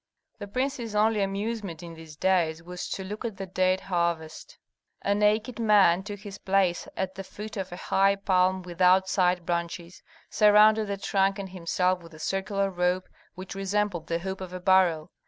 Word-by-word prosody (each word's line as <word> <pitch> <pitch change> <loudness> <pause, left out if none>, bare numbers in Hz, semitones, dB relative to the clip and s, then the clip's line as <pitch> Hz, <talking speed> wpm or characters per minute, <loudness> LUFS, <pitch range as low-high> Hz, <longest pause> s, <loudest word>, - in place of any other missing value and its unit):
The 205 - -6
prince's 245 -1 -3
only 215 0 +3
amusement 195 -3 -3
in 170 -1 -8
these 160 -2 -12
days 165 -2 +1
was 180 +1 -6
to 190 - -4
look 210 +4 -6
at 225 -5 -4
the 195 - -5
date 185 0 +1
harvest. 170 - -3 0.5
A 200 - +2
naked 210 +3 +1
man 205 -5 +5
took 205 0 -8
his 205 -2 -9
place 190 -2 +1
at 190 0 -2
the 195 - -7
foot 210 +3 -9
of 190 -3 -4
a - - -5
high 195 +2 +2
palm 185 -1 +1
without 180 +2 +3
side 180 -2 +1
branches, 170 0 -4 0.3
surrounded 215 +1 +5
the 200 0 -3
trunk 195 0 +1
and 195 -1 -6
himself 180 0 0
with 165 -1 -14
a - - -13
circular 195 +3 -1
rope 180 0 0 0.3
which 185 +1 -8
resembled 195 -3 -1
the 165 - 0
hoop 190 +2 -5
of 185 -1 -7
a 185 - -5
barrel. 180 -3 +3
190 Hz, 180 wpm, -27 LUFS, 180-205 Hz, 0.5 s, man